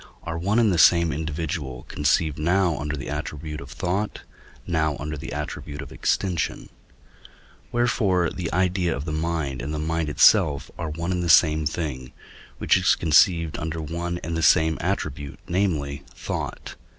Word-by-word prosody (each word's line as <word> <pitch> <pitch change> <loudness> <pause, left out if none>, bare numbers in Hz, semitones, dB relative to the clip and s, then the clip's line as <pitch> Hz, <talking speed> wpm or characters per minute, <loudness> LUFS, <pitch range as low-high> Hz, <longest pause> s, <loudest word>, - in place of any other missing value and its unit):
are 80 - -4
one 100 +6 +1
and 110 -5 +4
the 85 - +1
same 85 0 +6
individual 75 -4 -4
conceived 75 +1 0
now 90 +1 +2
under 75 +1 -3
the 65 - -6
attribute 75 0 -5
of 70 - -10
thought, 95 +4 -3 0.4
now 80 -4 0
under 75 +1 -5
the 75 - -7
attribute 75 0 -5
of 70 -3 -8
extension; 90 -6 -1 1.0
wherefore 105 -8 +1
the 90 -3 -4
idea 90 -2 +1
of 70 - -5
the 80 - -3
mind 80 -5 -2
and 75 +5 -4
the - - -2
mind 80 0 -1
itself 70 -1 +4
are 80 -1 -4
one 85 +3 -3
and 90 -1 0
the 85 - -2
same 80 -1 +5
thing, 70 -5 -4 0.5
which - - +3
is 95 0 +3
conceived 80 0 +3
under 80 +1 -4
one 85 +2 -3
and 80 0 -3
the 80 - -1
same 80 0 +4
attribute, 70 +1 -3
namely, 80 -7 -1
thought. - - -5
80 Hz, 160 wpm, -24 LUFS, 75-85 Hz, 1.0 s, same